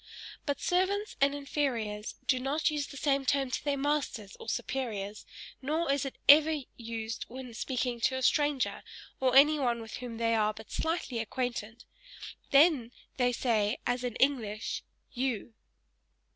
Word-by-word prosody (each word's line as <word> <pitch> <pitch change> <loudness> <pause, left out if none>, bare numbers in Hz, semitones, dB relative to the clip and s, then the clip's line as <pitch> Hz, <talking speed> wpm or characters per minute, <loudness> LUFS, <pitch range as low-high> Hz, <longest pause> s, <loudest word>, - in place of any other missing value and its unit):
But 285 - 0
servants 390 +4 0
and 280 +1 +4
inferiors 240 -7 -2
do 255 - +2
not 280 +5 +1
use 295 -1 -2
the 280 - -10
same 275 -1 +1
term 270 -1 +1
to - - -2
their 285 -1 0
masters, 275 -8 -1
or - - -7
superiors 215 -7 -3 0.3
nor 310 +3 0
is 280 0 0
it 270 - -5
ever 305 +1 +7
used 230 -1 -5
when 250 0 -8
speaking 245 0 -2
to 260 - +2
a 260 - -3
stranger, 290 -1 +2 0.4
or 260 -1 +2
anyone 275 -4 +5
with 225 -1 -7
whom 245 -2 -6
they 230 0 +1
are 215 -1 +2
but 220 +1 -12
slightly 320 -7 -1
acquainted 235 -1 -3 0.7
they 280 -5 +5 0.3
then 245 -1 +3
say 225 -2 +1
as 245 +1 0
in 245 -3 -3
English 230 -6 0 0.3
you. 245 -3 -2
260 Hz, 150 wpm, -30 LUFS, 230-285 Hz, 0.7 s, ever